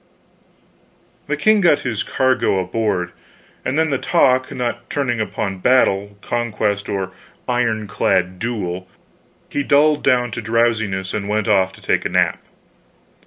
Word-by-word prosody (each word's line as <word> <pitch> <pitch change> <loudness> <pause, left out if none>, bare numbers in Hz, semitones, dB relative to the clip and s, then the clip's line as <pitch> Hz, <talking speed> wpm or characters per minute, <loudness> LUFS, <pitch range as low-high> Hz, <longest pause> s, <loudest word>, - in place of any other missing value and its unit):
The - - -1
king 215 -1 +4
got 170 -5 +4
his 115 -5 -2
cargo 130 -6 +1
aboard, 95 -1 -1 0.5
and 130 +3 -1
then, 160 -1 +2
the 135 - 0
talk 130 -6 +2
not 120 0 -4
turning 125 -5 -1
upon 100 -3 -3
battle, 100 -4 +2
conquest, 105 -4 -1
or 95 -2 -2 0.4
iron 115 -3 0
clad 95 -2 0
duel, 95 -6 -3 0.6
he 145 - -1
dulled 145 +2 +3
down 125 -3 +2
to 120 - -4
drowsiness 110 -4 0
and 105 -1 -3
went 105 0 0
off 95 -3 +3
to - - -16
take - - +1
a - - -2
nap. - - +1
115 Hz, 140 wpm, -19 LUFS, 100-130 Hz, 0.6 s, king